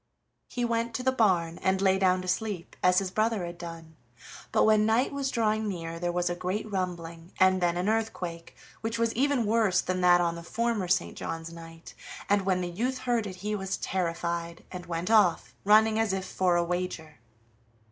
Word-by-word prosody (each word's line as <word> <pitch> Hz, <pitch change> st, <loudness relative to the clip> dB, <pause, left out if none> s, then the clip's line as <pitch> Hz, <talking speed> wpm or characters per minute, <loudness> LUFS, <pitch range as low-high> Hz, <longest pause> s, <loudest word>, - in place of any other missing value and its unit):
He 245 Hz, -1 st, -2 dB
went 230 Hz, 0 st, -1 dB
to 250 Hz, -, -3 dB
the 260 Hz, -, +3 dB
barn 180 Hz, -9 st, +1 dB
and 190 Hz, 0 st, +1 dB
lay 190 Hz, 0 st, +3 dB
down 185 Hz, -1 st, +2 dB
to -, -, -7 dB
sleep, 185 Hz, -1 st, -3 dB
as 180 Hz, 0 st, +4 dB
his 190 Hz, -1 st, +1 dB
brother 215 Hz, -2 st, 0 dB
had 170 Hz, 0 st, -8 dB
done; 165 Hz, -2 st, -9 dB, 0.6 s
but -, -, +3 dB
when 215 Hz, -1 st, +4 dB
night 225 Hz, +6 st, +2 dB
was 275 Hz, -1 st, -1 dB
drawing 220 Hz, -3 st, 0 dB
near 165 Hz, -4 st, -5 dB
there 175 Hz, 0 st, -1 dB
was 175 Hz, 0 st, -1 dB
a 175 Hz, -, 0 dB
great 185 Hz, +5 st, -3 dB
rumbling, 170 Hz, -2 st, -4 dB
and 185 Hz, 0 st, +4 dB
then 175 Hz, 0 st, +1 dB
an 180 Hz, +2 st, -1 dB
earthquake, 200 Hz, -7 st, -3 dB, 0.3 s
which 225 Hz, +1 st, -2 dB
was 230 Hz, -1 st, +1 dB
even 270 Hz, -1 st, +1 dB
worse 210 Hz, -4 st, +2 dB
than 185 Hz, 0 st, -1 dB
that 175 Hz, 0 st, +6 dB
on 170 Hz, -1 st, +1 dB
the 170 Hz, -, -7 dB
former 225 Hz, +2 st, -1 dB
St. 185 Hz, 0 st, 0 dB
John's 165 Hz, 0 st, -5 dB
night, 165 Hz, 0 st, -11 dB, 0.3 s
and 200 Hz, -1 st, +1 dB
when 185 Hz, -1 st, +2 dB
the 175 Hz, -1 st, -3 dB
youth 245 Hz, +8 st, -2 dB
heard 240 Hz, -4 st, -1 dB
it 185 Hz, -, -7 dB
he 210 Hz, -, -1 dB
was 195 Hz, -2 st, -2 dB
terrified, 170 Hz, -1 st, -3 dB
and 180 Hz, -1 st, -8 dB
went 170 Hz, +4 st, -3 dB
off, 205 Hz, -7 st, +3 dB
running 215 Hz, +1 st, +5 dB
as 220 Hz, -3 st, +1 dB
if 190 Hz, -1 st, -2 dB
for 185 Hz, -2 st, +1 dB
a 175 Hz, -, +2 dB
wager. 175 Hz, -5 st, -4 dB
185 Hz, 200 wpm, -28 LUFS, 175-220 Hz, 0.6 s, that